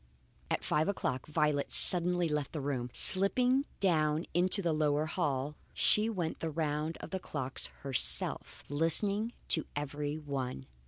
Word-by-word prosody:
At - - -3
five 155 - -1
o'clock 130 -10 -4
Violet 150 -2 -1
suddenly 180 -1 +5
left 150 -3 -4
the 155 - -5
room. 135 -3 -4
Slipping 250 - +5
down 155 -4 0
into 185 +4 +1
the 170 -2 -1
lower 150 0 -1
hall, 150 -4 -3 0.2
she 215 +1 +2
went 175 -7 -5
the 165 - -4
round 155 0 -4
of - - -10
the 190 - -4
clocks 135 -6 -1 0.2
herself, 135 -3 0
listening 200 +9 +1 0.2
to 160 - +2
every 145 +1 -5
one. 135 - -6
155 Hz, 145 wpm, -30 LUFS, 145-180 Hz, 0.2 s, suddenly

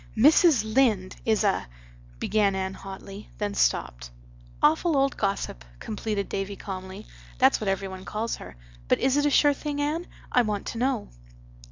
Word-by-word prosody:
"Mrs. 295 - +6
Lynde 215 -8 +2
is 220 -1 +3
a—" 195 - +1 0.5
began 200 - +1
Anne 190 0 -2
hotly; 195 +1 -9
then 205 -1 -2
stopped. - - 0 0.5
"Awful 315 +1 +3
old 275 +1 +2
gossip," 195 - -2 0.2
completed 210 -2 -3
Davy 195 +1 -3
calmly. 190 +1 -7 0.3
"That's 265 -2 +4
what 215 - -3
every 195 0 0
one 190 0 -8
calls 215 +3 -3
her. 65 - -11 0.3
But - - +3
is 265 +1 +2
it 290 0 +3
a - - +3
sure 290 0 +5
thing, 290 0 -4
Anne? 310 +4 -1 0.2
I 250 - +5
want 210 -3 -2
to 230 - -5
know." 255 -3 0
215 Hz, 165 wpm, -26 LUFS, 195-270 Hz, 0.5 s, Mrs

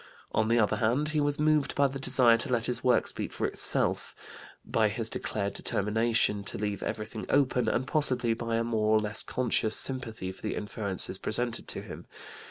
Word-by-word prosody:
On 110 - +1
the 115 +1 +2
other 110 -1 +2
hand, 120 +8 +1
he 155 -1 0
was 145 0 0
moved 150 -2 +2
by 140 - +3
the 135 0 -2
desire 125 -3 +4
to 125 +4 -2
let 120 -2 +1
his 125 - -1
work 125 -1 +3
speak - - -4
for - - -3
itself, - - 0 0.5
by - - +1
his - - -3
declared 100 -2 -3
determination 105 0 +1
to - - -1
leave 105 0 -3
everything 110 0 -5
open, 130 -3 +2
and 130 - 0
possibly 130 -6 +1
by 115 0 -3
a 115 - +1
more 110 -2 +1
or - - +3
less 105 0 +1
conscious 115 -3 0
sympathy 130 -7 -2
with 95 0 -6
the 110 - -3
inferences 100 -2 -2
presented 120 +1 0
to - - -1
him. - - -10
115 Hz, 190 wpm, -29 LUFS, 110-130 Hz, 0.5 s, desire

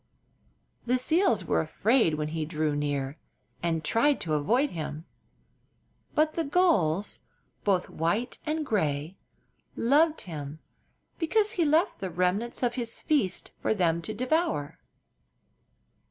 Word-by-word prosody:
The 250 +1 +3
seals 330 +9 +2
were - - +2
afraid 225 -9 +2
when 150 0 -2
he 160 0 -2
drew 155 -1 -1
near, 145 0 -2 0.4
and 165 -2 -1
tried 275 - +2
to 155 - -1
avoid 240 - +2
him; 155 -1 -5 1.1
but 310 +1 +3
the 330 - -1
gulls, 245 - +2 0.4
both 190 -3 +1
white 205 +10 -1
and 310 0 -2
gray, 160 - -1 0.6
loved 300 +6 +3
him 150 -4 -6 0.6
because 420 +5 +2
he 350 -7 +1
left 315 +6 +2
the 190 - -3
remnants 185 +8 -1
of 240 -1 +2
his 235 -2 -4
feasts 255 - 0
for - - +1
them 170 -4 +1
to 170 - -5
devour. 255 - -1
205 Hz, 125 wpm, -28 LUFS, -, 1.1 s, The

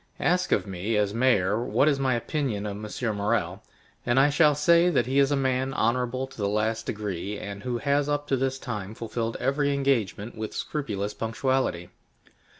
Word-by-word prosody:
Ask 180 +1 +1
of - - +2
me, 100 +3 -2
as 105 -1 +1
mayor, 115 -3 +2
what 135 +3 +2
is 140 -2 +2
my 130 -2 +2
opinion 120 -4 -2
of 105 - -2
M. 105 +2 -3
Morrel, 100 +1 -1 0.4
and 120 +2 +2
I 140 +2 +5
shall 150 0 +4
say 170 +4 +4
that 135 -8 +2
he 135 +3 +1
is 140 -1 +4
a 145 - +2
man 130 0 0
honorable 125 +3 0
to 130 - -16
the 100 -2 0
last 110 +2 -1
degree, 105 -1 -4
and 100 -1 -7
who 120 +2 -2
has 140 +2 +1
up 145 0 0
to 135 - +3
this 135 0 -1
time 105 -5 -5
fulfilled 115 0 -3
every 140 +1 +1
engagement 120 -6 0
with 110 -1 -5
scrupulous 105 -9 -3
punctuality. 115 -6 -1
120 Hz, 185 wpm, -26 LUFS, 105-135 Hz, 0.4 s, I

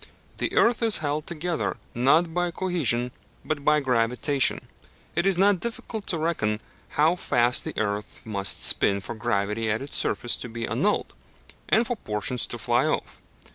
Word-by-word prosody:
The - - -2
earth 235 0 +3
is 225 -2 +3
held 145 +1 -2
together 170 0 -2 0.2
not 155 +7 +3
by 175 0 0
cohesion 165 -10 0 0.3
but 155 -2 -2
by 150 +1 +4
gravitation; 125 +2 +1 0.5
it 170 - +1
is 195 -2 +3
not 195 0 +4
difficult 225 -1 -5
to 170 - 0
reckon 155 -10 -1 0.4
how 155 +4 +4
fast 120 -8 +2
the - - -4
earth 105 -1 -3
must 100 -3 0
spin 100 0 +5
for 120 - -6
gravity 105 +1 -1
at 110 +4 -1
its 140 - -7
surface 120 - +2
to 125 - -7
be 115 0 -4
annulled, 145 - 0 0.6
and 225 +2 +4
for 240 +1 -3
portions 110 - -2
to - - -5
fly - - +1
off. - - -3
140 Hz, 165 wpm, -25 LUFS, 115-175 Hz, 0.6 s, spin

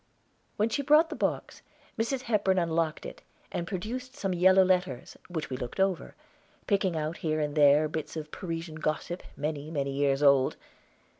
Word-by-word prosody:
When 215 +2 +2
she 280 - -1
brought 300 +4 +4
the - - -3
box, - - -2 0.3
Mrs. 240 +3 -1
Hepburn 205 -5 +1
unlocked 165 -2 0
it, - - -8 0.3
and 170 - -3
produced 250 +8 -5
some 195 -9 -2
yellow 185 +2 +6
letters, 180 -9 0
which 160 -5 -4
we 130 - -2
looked 125 +8 -6
over, 190 -2 0 0.5
picking 195 -4 +1
out 155 +2 -3
here 155 -1 -1
and 150 -1 -1
there 150 0 +5
bits 155 +1 -5
of 155 -1 -6
Parisian 165 -3 -5
gossip, 155 +3 -2 0.2
many, 150 0 -3
many 140 -3 -2
years 140 0 +1
old. 140 -2 +5
165 Hz, 165 wpm, -29 LUFS, 150-190 Hz, 0.5 s, yellow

